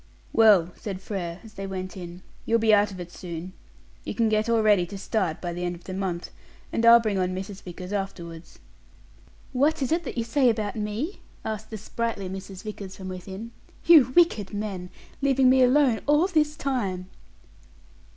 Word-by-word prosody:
"Well," 200 -6 +5
said 195 -3 -5
Frere, 180 -3 -5
as 220 -2 -13
they 195 0 -6
went 185 -1 -5
in, 175 -1 -9 0.2
"you'll 230 - +2
be 220 -1 +4
out 205 0 +5
of 190 -2 -9
it 175 -1 -7
soon. 175 +1 -7 0.5
You - - -5
can 230 -2 +2
get 215 +1 +1
all 230 -1 +3
ready 205 -5 +4
to 200 - -7
start 190 -5 -1
by 175 -1 -4
the 175 +1 -4
end 175 0 -2
of 170 - -15
the 185 - -7
month, 185 -2 -3 0.4
and 230 - 0
I'll 235 0 +10
bring 215 -4 -1
on 185 0 0
Mrs. 195 +1 -6
Vickers 180 +2 -8
afterwards." 175 -4 -5 1.0
"What 285 +3 +2
is 260 - -1
that 330 -6 -1
you 230 - +1
say 250 +3 +3
about 215 -3 -1
me?" 220 - -3 0.3
asked 215 -1 -4
the 220 - -5
sprightly 215 -1 -3
Mrs. 190 0 -8
Vickers 205 -3 -7
from 190 -1 -7
within. 190 +5 -7 0.3
"You 300 -7 +7
wicked 225 - +3
men, 195 -4 -4 0.3
leaving 270 -2 +4
me 260 0 +5
alone 255 -2 +4
all 295 +4 +5
this 305 -5 +1
time!" 205 - -2
205 Hz, 185 wpm, -26 LUFS, 185-235 Hz, 1.0 s, I'll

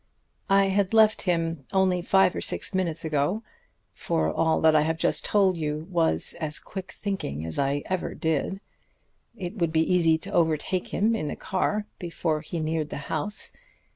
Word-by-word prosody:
I 195 0 +4
had 195 +2 +1
left 220 -1 +5
him 165 -5 -1
only 190 -2 +2
five 190 +1 +3
or - - -3
six - - +1
minutes 170 -4 0
ago 155 +8 0 0.5
for 80 0 -1
all 160 -1 +1
that 160 -1 +5
I 155 - +5
have 160 +1 -1
just - - +2
told 195 -4 +2
you 155 0 -3
was 165 -2 +4
as 155 -2 -1
quick 190 -1 -8
thinking 80 - -4
as 80 - -5
I 140 +1 0
ever 185 -1 -3
did. 160 +5 -2 0.8
It 185 +2 -6
would 170 -2 +1
be 160 0 +3
easy 165 -3 +4
to 190 +5 -8
overtake 165 +2 0
him 220 +4 +1
in 155 - -3
the - - -4
car 205 +2 -1
before 165 -3 -2
he 165 +2 -5
neared 155 -1 -2
the - - -5 0.2
house. 205 +7 -1
165 Hz, 175 wpm, -26 LUFS, 155-190 Hz, 0.8 s, left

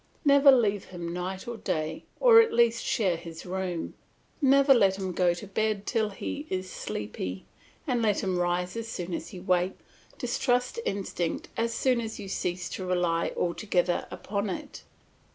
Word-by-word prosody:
Never 280 0 +7
leave 210 -6 +2
him 170 -2 -6
night 185 +3 -4
or 235 -1 -4
day, 160 -6 -3
or 475 -2 +8
at 455 0 +1
least 235 -1 +3
share 210 -9 +1
his 165 -1 -9
room; 180 -2 -3 0.5
never 275 0 +6
let 195 -6 +4
him 190 -1 -3
go 175 -1 +2
to 175 - -8
bed 205 +1 -1
till 220 -3 0
he 285 +9 -5
is 185 0 -2
sleepy, 95 -3 -5 0.4
and 250 -6 0
let 210 -3 +1
him 185 -2 0
rise 180 +1 0
as 230 0 -4
soon 180 -5 -5
as - - -4
he 185 - -8
wakes. 180 0 +1 0.4
Distrust 250 - 0
instinct 185 -4 -2
as 230 0 0
soon 250 0 +1
as 225 -1 -5
you 200 -2 -7
cease 180 -2 -2
to 190 - -5
rely 175 -2 +1
altogether 175 0 0
upon 200 0 -3
it. - - -6
190 Hz, 170 wpm, -28 LUFS, 180-230 Hz, 0.5 s, or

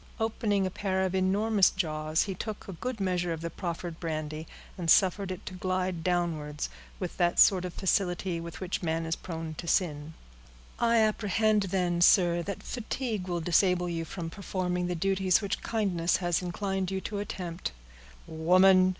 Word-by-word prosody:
'" - - -23
Opening 215 -3 0
a 185 - -2
pair 190 0 -1
of 190 -1 -1
enormous 195 +2 +3
jaws, 155 -3 0
he 195 - -3
took 215 +3 -6
a 195 - -6
good 245 +6 -4
measure 180 -2 0
of 165 - -6
the 170 0 -4
proffered 170 -1 -5
brandy, 155 -1 -4 0.3
and 175 -3 -3
suffered 190 +2 +4
it 185 -1 -6
to - - -6
glide 185 -2 -2
downwards, 165 -4 -1 0.3
with 180 -3 -5
that 175 -1 +2
sort 185 -2 +6
of 180 - -5
facility 180 -2 0
with 170 -1 -7
which 185 -1 -3
man 165 -1 -1
is 165 0 -1
prone 165 -2 -6
to 170 - -6
sin. 155 -3 0 0.6
"I 235 0 +3
apprehend, 215 -1 +2
then, 175 -2 0
sir, 175 -2 +5
that 200 +3 -5
fatigue 225 -4 -3
will 175 -1 -1
disable 180 +2 +3
you 165 -1 -2
from 165 0 -6
performing 180 -2 -2
the 180 - -1
duties 190 +1 +2
which 200 -2 -3
kindness 185 -7 +1
has 175 -2 0
induced 190 +1 -2
you 190 0 -2
to 205 +2 -4
attempt." 180 - -4 0.5
"Woman!" 185 +3 +5
180 Hz, 175 wpm, -29 LUFS, 170-195 Hz, 0.6 s, sort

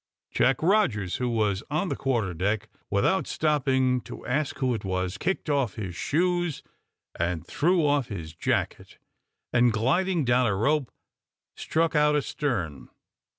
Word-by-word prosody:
Jack 135 +3 +2
Rogers, 145 - +2
who 125 -1 -1
was 105 -4 0
on 155 +5 -1
the - - -1
quarter 115 -9 -1
deck, 95 +6 -1 0.2
without 190 - +1
stopping 130 -4 +1
to - - -10
ask 145 +3 -1
who 130 -2 +1
it 115 - -4
was, 95 -1 -2
kicked 190 0 -1
off 140 -9 0
his 95 -5 -5
shoes, 175 - 0 0.6
and 85 -1 -1
threw 170 +1 +2
off 145 -4 +2
his 85 -6 -7
jacket, 80 - -2 0.6
and 120 0 +4
gliding 165 +9 +1
down 120 0 +3
a 100 - +1
rope, 135 +6 +1 0.7
struck 165 0 0
out 150 0 +4
astern. 120 - -2
125 Hz, 145 wpm, -26 LUFS, 105-150 Hz, 0.7 s, and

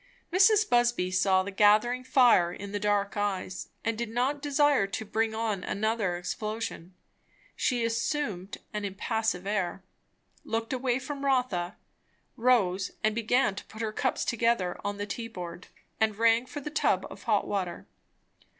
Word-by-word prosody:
Mrs. 410 +3 +5
Busby 240 -6 +2
saw 185 0 +3
the 200 - -5
gathering 215 +5 +4
fire 245 -9 +5
in 195 +2 -7
the 205 - -2
dark 205 -1 0
eyes, 195 -3 -2 0.2
and 225 0 +1
did 235 0 -3
not 255 +5 0
desire 290 -6 +3
to 210 +3 -4
bring 220 +1 0
on 220 -4 -1
another 210 -4 -1
explosion. 190 -1 -5 0.6
She 240 -2 0
assumed 230 -4 -2 0.2
an 210 -1 -3
impassive 200 -1 -1
air, 195 -2 -2 0.6
looked 225 +2 -2
away 250 -1 0
from 280 +1 -6
Rotha, 250 -10 0 0.6
rose 200 -6 +2
and 215 0 +3
began 235 0 +2
to 200 - -8
put 220 +1 -7
her 215 -1 -2
cups - - 0
together 230 -6 0
on 205 0 -3
the 205 - -3
tea 230 +3 -5
board, 175 -4 -8 0.3
and 220 -1 +2
rang 230 +2 +3
for 290 - -6
the 295 - -6
tub 310 - +1
of - - -11
hot - - +2
water. 185 -4 -3
220 Hz, 155 wpm, -28 LUFS, 195-240 Hz, 0.6 s, Mrs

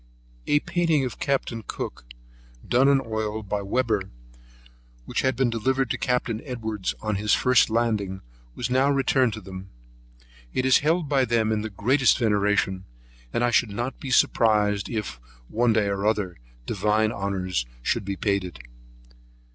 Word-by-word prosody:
A 145 - +3
painting 170 -5 +1
of 125 - -6
Capt. 140 -3 0
Cook, - - -6 0.6
done 130 +3 +4
in 140 -1 +5
oil 110 -1 -3
by 100 +1 -2
Webber, 110 +1 0 1.0
which - - -1
had 130 -1 +1
been 125 -1 +1
delivered 130 +2 0
to - - -1
Capt. 125 -1 0 0.2
Edwards 110 -7 -4
on 110 -2 -1
his 105 +1 +2
first 125 -2 +4
landing, 110 -4 -1 0.3
was 120 0 -3
now 130 +2 +3
returned 135 -3 +2
to 110 - -7
them. 95 0 -9 0.9
It 130 - +1
is 130 - +5
held 160 +2 +1
by 135 -2 +2
them 115 -2 +1
in 110 -1 0
the 110 - -4
greatest 125 +5 +3
veneration; 105 -4 +1 0.5
and 120 - 0
I 120 - +2
should 115 0 +3
not 120 +6 -4
be 135 - -6
surprised 105 -5 +3
if, 105 - -4 0.3
one 120 - +2
day 110 -2 +2
or 100 +1 -1
other, 100 -5 -1 0.3
divine 105 - +1
honours 95 -8 -2 0.2
should - - 0
be 100 0 -3
paid 100 0 0
to 90 - -5
it. 85 - -12
110 Hz, 165 wpm, -25 LUFS, 100-130 Hz, 1.0 s, in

